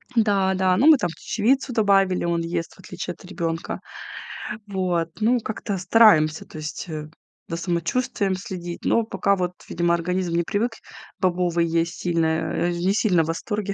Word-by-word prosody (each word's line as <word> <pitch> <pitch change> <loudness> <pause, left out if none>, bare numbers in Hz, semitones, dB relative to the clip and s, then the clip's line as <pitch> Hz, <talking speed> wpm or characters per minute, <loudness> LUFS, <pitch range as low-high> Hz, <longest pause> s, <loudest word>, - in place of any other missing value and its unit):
Да-да, 190 -4 +2
ну, 275 - +4
мы 315 -2 +9
там - - -1
чечевицу 250 - 0
добавили, 195 -4 +3
он 170 -1 0
ест, 165 0 -3
в - - -24
отличие 185 0 -6
от 180 - -17
ребёнка. 170 -3 -3 0.9
Вот, 180 -4 -1
ну, 240 +3 +3
как-то 215 -2 -4
стараемся, 180 -6 +5
то - - -11
есть, 155 +3 -5
э, 155 -1 -5 0.4
за 165 - -3
самочувствием 185 +4 -1
следить, 175 -2 -7
но 230 - +3
пока 200 -2 +1
вот, 180 -1 -2 0.2
видимо, 170 0 +1
организм 180 +1 -1
не 170 - +2
привык 220 +7 0 0.5
бобовые 175 -2 +1
есть 165 +1 0
сильно, 165 -2 +1
э, 160 +2 0
не 175 +3 0
сильно 185 -6 +3
в 160 - -5
восторге, 205 +4 -2
180 Hz, 160 wpm, -23 LUFS, 170-200 Hz, 0.9 s, мы